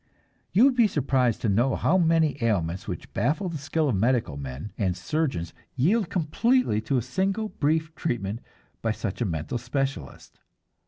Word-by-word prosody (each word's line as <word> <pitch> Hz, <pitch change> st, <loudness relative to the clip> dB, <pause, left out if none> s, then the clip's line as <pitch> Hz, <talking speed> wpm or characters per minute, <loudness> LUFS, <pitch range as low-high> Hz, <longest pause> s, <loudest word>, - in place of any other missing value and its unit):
You 200 Hz, +8 st, +5 dB
would 275 Hz, -, +5 dB
be 235 Hz, -3 st, +5 dB
surprised 130 Hz, -, +1 dB
to -, -, 0 dB
know 120 Hz, +7 st, +2 dB
how 175 Hz, -, +2 dB
many 160 Hz, -6 st, +2 dB
ailments 90 Hz, -5 st, 0 dB
which -, -, -6 dB
baffle 150 Hz, -, 0 dB
the 160 Hz, -3 st, -5 dB
skill 155 Hz, +2 st, 0 dB
of 125 Hz, -, +1 dB
medical 115 Hz, -, +1 dB
men 70 Hz, +7 st, -6 dB
and 95 Hz, -4 st, -1 dB
surgeons 135 Hz, -, -2 dB, 0.2 s
yield 180 Hz, -, +2 dB
completely 180 Hz, -, +1 dB
to 130 Hz, +5 st, 0 dB
a 120 Hz, -, 0 dB
single 195 Hz, -, -1 dB
brief 160 Hz, 0 st, 0 dB
treatment 115 Hz, -9 st, -2 dB, 0.4 s
by 115 Hz, -1 st, 0 dB
such 110 Hz, 0 st, -4 dB
a -, -, +2 dB
mental 80 Hz, +5 st, -3 dB
specialist. 135 Hz, -, -4 dB
130 Hz, 165 wpm, -26 LUFS, 105-160 Hz, 0.4 s, You